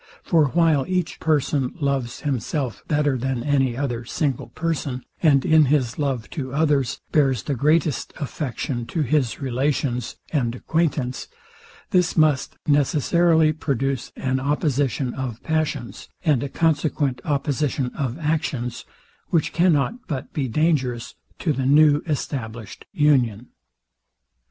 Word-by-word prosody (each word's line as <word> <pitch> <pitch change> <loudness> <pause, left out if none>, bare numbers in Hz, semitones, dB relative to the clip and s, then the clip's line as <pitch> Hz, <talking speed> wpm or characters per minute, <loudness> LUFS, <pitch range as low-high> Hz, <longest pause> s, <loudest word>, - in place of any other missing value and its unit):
For 165 -6 +3
while 160 -1 +3
each 180 -2 -1
person 145 -4 0
loves 140 -4 -1
himself 135 -2 -2
better 145 -3 +1
than 130 -1 -2
any 135 -4 +1
other 120 -4 -2
single 135 +2 -2
person, 145 -6 -3 0.2
and 140 -5 +4
in 155 -1 +5
his 130 -3 +1
love 135 -6 -1
to 130 -4 -4
others 145 -5 +1
bears 135 -6 +2
the 145 - -2
greatest 150 +2 +1
affection 125 -3 -3
to 160 - -1
his 135 -3 0
relations 130 -1 -1 0.2
and 120 -6 0
acquaintance, 145 -3 -1 0.6
this 180 -2 +2
must 155 -4 +2
necessarily 155 +3 +3
produce 135 -3 -2
an 130 0 -1
oppositon 140 -2 0
of 125 -4 -5
passions, 155 -6 -2 0.2
and 150 -6 +3
a 140 - -3
consequent 150 -4 0
opposition 140 -3 -1
of 130 -2 -2
actions; 150 -7 -2 0.4
which 165 -3 0
cannot 175 - +1
but 135 -4 -5
be 140 -3 -1
dangerous 130 -3 0 0.2
to 155 - 0
the 130 -1 -1
new 150 +1 +5
established 120 - -4
union. 125 -7 +2
140 Hz, 125 wpm, -23 LUFS, 130-155 Hz, 0.6 s, in